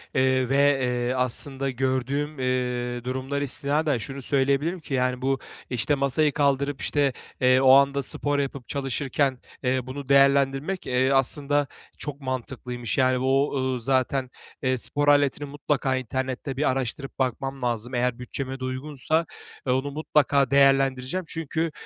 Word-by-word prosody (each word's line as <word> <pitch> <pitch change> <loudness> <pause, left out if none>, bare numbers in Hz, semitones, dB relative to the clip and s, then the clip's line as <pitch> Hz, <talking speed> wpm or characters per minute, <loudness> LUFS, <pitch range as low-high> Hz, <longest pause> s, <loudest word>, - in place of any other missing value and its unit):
eee, 130 -1 +2
ve, 135 - +1 0.3
eee, 125 0 0
aslında 135 +2 0
gördüğüm, 135 +3 -1
eee, 125 -1 -1
durumlara 130 +3 -2
istinaden 145 +1 0
şunu 135 +5 -7
söyleyebilirim 140 +6 +1
ki, 150 - -8
yani, 125 -1 0
bu, 135 +1 0 0.3
işte, 125 +4 +1
masayı 140 +2 +2
kaldırıp, 140 -1 +1
işte, 140 -3 +1 0.3
eee, 130 0 +5
o 130 - +6
anda 140 +1 +5
spor 145 +1 0
yapıp 140 -3 -4
çalışırken, 135 -1 -1 0.2
eee, 130 0 +1
bunu 140 +1 -7
değerlendirmek, 140 +5 +3
eee, 130 +2 +2
aslında 140 +2 +2 0.3
çok 145 -1 -6
mantıklıymış. 125 -3 -4
Yani, 130 -1 +3
o, 135 +2 +2
ııı, 130 -1 -1
zaten, 130 +1 0 0.3
eee, 130 0 +1
spor 145 +4 -1
aletini 145 0 +3
mutlaka 140 -2 -1
internette 130 +2 -3
bir 150 - +2
araştırıp 135 +1 -3
bakmam 135 +1 -2
lazım. 120 0 -2
Eğer 125 0 0
bütçeme 130 +2 -5
de - - -7
uygunsa, 140 +5 -1 0.4
eee, 125 - +3
onu 135 +2 -1
mutlaka 145 -2 +2
değerlendireceğim. 135 +3 +3
Çünkü, 160 +1 -2
135 Hz, 145 wpm, -25 LUFS, 130-140 Hz, 0.4 s, o